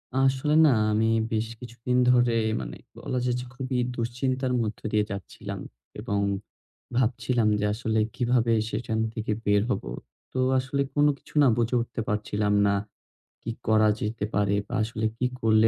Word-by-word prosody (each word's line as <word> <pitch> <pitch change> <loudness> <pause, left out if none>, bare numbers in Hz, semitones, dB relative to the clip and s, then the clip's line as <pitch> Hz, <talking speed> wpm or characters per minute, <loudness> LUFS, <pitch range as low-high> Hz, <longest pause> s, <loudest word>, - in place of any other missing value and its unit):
আসলে 135 +3 +2
না, - - +6 0.2
আমি 110 +1 +2 0.3
বেশ 110 0 0
কিছুদিন 125 +1 -3
ধরে 120 -1 +4 0.3
মানে - - -6 0.2
বলা 130 - -3
যাচ্ছে 125 0 -1
খুবই 130 -1 -2 0.2
দুশ্চিন্তার 125 +2 -1
মধ্য 110 -1 -3
দিয়ে 105 -1 +2
যাচ্ছিলাম 100 -2 -6 0.4
এবং 100 0 -1 0.8
ভাবছিলাম 120 -1 +1
যে 105 - 0
আসলে 110 0 0 0.2
কিভাবে 120 -2 +2 0.2
সেখান 115 -1 -2
থেকে 110 -1 -3
বের 105 0 +4
হব। 100 - -1 0.5
তো 130 - -2 0.2
আসলে 135 +2 -1
কোন 145 0 +4
কিছু - - -20
না - - +6
বুঝে 120 +1 +1
উঠতে 120 0 -4
পারছিলাম 105 0 0
না, 100 - +3 0.7
কি 115 - -4 0.2
করা 110 0 +5
যেতে 105 0 -2
পারে 100 0 +2
বা - - -8
আসলে 110 0 -3
কি 125 - 0 0.2
করলে 110 0 +5
115 Hz, 155 wpm, -26 LUFS, 110-125 Hz, 0.8 s, না